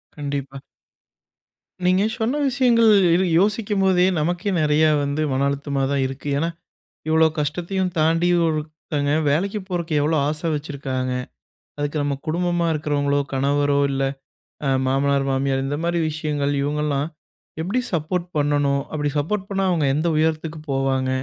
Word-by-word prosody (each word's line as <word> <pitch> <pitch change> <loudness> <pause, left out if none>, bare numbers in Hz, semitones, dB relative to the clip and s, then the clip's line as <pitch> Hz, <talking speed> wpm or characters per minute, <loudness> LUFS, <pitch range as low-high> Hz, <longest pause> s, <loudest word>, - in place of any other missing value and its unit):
கண்டிப்பா. 140 -2 -4 1.3
நீங்க 185 +2 +3 0.2
சொன்ன 245 +7 0
விஷயங்கள் 240 -3 +4 0.2
இது 180 +3 +3 0.2
யோசிக்கும்போதே, 200 -3 +2
நமக்கே 175 +5 -1
நெறைய 150 0 +3 0.2
வந்து 140 +2 -1
மன 135 +1 +1
அழுத்தமா 140 0 -2
தான் 140 -1 +1
இருக்கு. 135 +2 -8
ஏன்னா, 165 +3 0 0.6
இவ்ளோ 160 0 +5
கஷ்டத்தையும் 175 +6 -1
தாண்டி, 165 +2 +3 0.2
ஒருத்தங்க 155 -2 -2 0.2
வேலைக்கி 195 +8 0
போறதுக்கு 170 -4 -3
எவ்ளோ 155 +2 +1
ஆச 150 +1 -2
வச்சிருக்காங்க! 135 -3 -3 0.6
அதுக்கு 145 +1 -2
நம்ம 145 -1 -1
குடும்பமா 175 +1 0
இருக்கிறவங்களோ, 145 -1 0
கணவரோ, 140 +1 +1
இல்ல 135 0 -1 0.6
அ 135 - +1 0.2
மாமனார், 140 +1 +1
மாமியார் 135 0 0
இந்த 145 +2 -2
மாதிரி 170 0 0
விஷயங்கள், 150 -2 -1
இவங்கள்லாம் 145 0 -1 0.5
எப்படி 195 +9 0
சப்போர்ட் 170 +2 -1
பண்ணணும்? 145 -1 +1
அப்படி 145 -1 -1
சப்போர்ட் 195 +6 -2
பண்ணா, 195 -1 -1
அவங்க 160 -4 +1
எந்த 160 +3 0
உயரத்துக்கு 155 0 0
போவாங்க? 135 -1 0
150 Hz, 130 wpm, -22 LUFS, 140-175 Hz, 1.3 s, இவ்ளோ